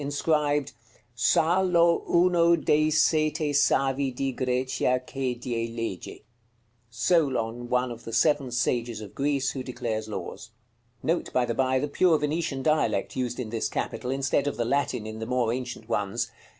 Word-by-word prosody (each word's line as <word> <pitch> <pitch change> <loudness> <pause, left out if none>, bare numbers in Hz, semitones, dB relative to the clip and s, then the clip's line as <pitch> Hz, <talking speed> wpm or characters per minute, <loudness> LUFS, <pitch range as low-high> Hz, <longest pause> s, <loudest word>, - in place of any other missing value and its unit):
Inscribed: 145 0 0 0.4
"SAL^O 170 - +3
UNO 170 -1 +4
DEI 155 -1 +2
SETE 155 0 +2
SAVI 135 -1 +2
DI 135 +1 -2
GRECIA 125 0 0
CHE 130 -2 -3
DIE 120 -1 -3
LEGE." 115 -6 -5 0.7
Solon, 120 -3 0
one 125 0 +1
of 120 0 -9
the 115 - -7
seven 140 +3 +2
sages 120 -2 -1
of 105 -3 -9
Greece, 140 -1 0
who 135 - -5
declares 120 -4 -4
laws. 100 +2 -6 0.5
Note, 170 +2 -1
by 125 - +2
the 120 - -2
by, 130 +2 +1
the 145 - -1
pure 165 +3 +3
Venetian 150 -2 -2
dialect 155 0 +1
used 125 -1 -2
in 115 -4 -4
this 115 -1 -1
capital, 125 - -3
instead 135 +1 0
of 145 - -2
the 120 - 0
Latin 130 -3 0
in 110 0 -7
the 110 - -5
more 125 -2 +1
ancient 125 -3 -6
ones. 105 -4 -2
130 Hz, 155 wpm, -26 LUFS, 120-150 Hz, 0.7 s, UNO